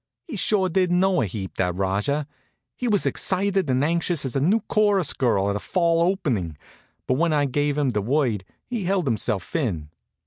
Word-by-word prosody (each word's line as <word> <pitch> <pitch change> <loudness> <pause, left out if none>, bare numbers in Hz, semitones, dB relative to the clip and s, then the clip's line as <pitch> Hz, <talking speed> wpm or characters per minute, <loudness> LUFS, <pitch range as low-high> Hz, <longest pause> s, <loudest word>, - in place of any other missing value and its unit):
He 290 - -6
sure 195 -1 +1
did 185 +1 +1
know 185 +1 +3
a 110 - 0
heap, 95 0 -6
that 90 -2 0
Rajah. 100 +10 -1 0.5
He 250 - -3
was 205 -4 +2
as - - -5
excited 190 -3 +1
and 130 +1 +2
anxious 165 -1 0
as 130 - -3
a - - +2
new 200 +10 +3
chorus 205 -5 +2
girl 100 -6 +1
at - - -2
a - - -1
fall 170 - +1
opening; 125 - 0 0.5
but - - +1
when 165 -1 +2
I 145 -1 +2
gave 145 +2 0
him 145 -3 +2
the 105 -3 -1
word 120 -3 0 0.2
he 235 -6 -4
held 190 -2 +1
himself 110 - -1
in. 90 - -2
150 Hz, 200 wpm, -24 LUFS, -, 0.5 s, know